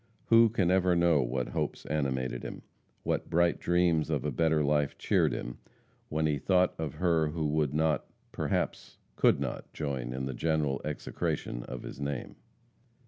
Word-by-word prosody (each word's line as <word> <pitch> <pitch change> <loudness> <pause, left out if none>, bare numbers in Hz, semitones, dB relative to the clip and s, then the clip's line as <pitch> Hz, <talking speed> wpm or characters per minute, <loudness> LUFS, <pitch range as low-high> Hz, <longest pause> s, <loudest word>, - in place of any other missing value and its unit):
Who 115 0 +7
can 95 -5 +1
ever 95 -1 +3
know 85 -4 +4
what 60 0 -2
hopes - - -3
animated 65 -4 -1
him; - - -7 0.4
what - - -1
bright 85 +1 +2
dreams 85 -3 +2
of 75 -4 -1
a 75 - 0
better 80 +2 +2
life 75 0 +1
cheered - - +2
him, - - -5 0.5
when 80 +1 0
he 75 -2 +1
thought 90 +3 +3
of 80 -4 -3
her 85 -3 +2
who 80 +1 -2
would 75 -2 0
not 80 -1 +1 0.2
perhaps - - -2 0.2
could - - +4
not - - -4
join 65 -5 -3
in 65 +1 -3
the 65 - -3
general 75 0 0
execration 75 -4 -3
of 60 - -7
his - - -8
name? 70 -2 -4
75 Hz, 165 wpm, -30 LUFS, 70-85 Hz, 0.5 s, Who